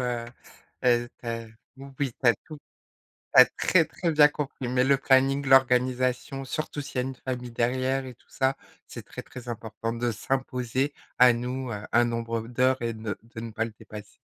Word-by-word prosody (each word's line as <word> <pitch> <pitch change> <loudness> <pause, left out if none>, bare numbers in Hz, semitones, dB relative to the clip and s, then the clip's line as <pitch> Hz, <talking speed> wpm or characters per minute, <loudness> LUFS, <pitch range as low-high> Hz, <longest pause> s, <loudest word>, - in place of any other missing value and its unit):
heu, 120 -1 -2 0.6
heu, 120 -1 +3
tu - - -12
as 115 0 -3 0.3
oui, 135 -1 -4
tu 125 - -4
as 120 - +6
tout 155 -2 -10 0.8
tu - - +12
as - - +9
très, 170 -3 +2
très 170 +2 -2
bien 150 -1 +7
compris, 145 -3 -5
mais 125 +1 +2
le 135 +1 +4
planning, 135 +1 +3
l'organisation, 130 0 +2
surtout 150 +2 -4
s'il 140 - -10
y - - +1
a - - -3
une 135 - -6
famille 125 -1 -5
derrière 130 +3 0
et 125 - -9
tout - - -31
ça, 135 0 0 0.3
c'est - - -9
très, - - -8
très 125 -2 -10
important 115 0 -4
de 120 0 -1
s'imposer 130 +3 -2 0.3
à 125 0 +8
nous, 125 +2 -4
heu, 105 - -3
un 120 +1 +4
nombre 115 -1 -2
d'heures 130 +2 +1
et 115 -1 -1
de 110 -1 -5
de 115 0 -10
ne 115 0 -6
pas 115 +1 -1
le 115 - -7
dépasse. 105 -1 -11
125 Hz, 200 wpm, -27 LUFS, 115-135 Hz, 0.8 s, tu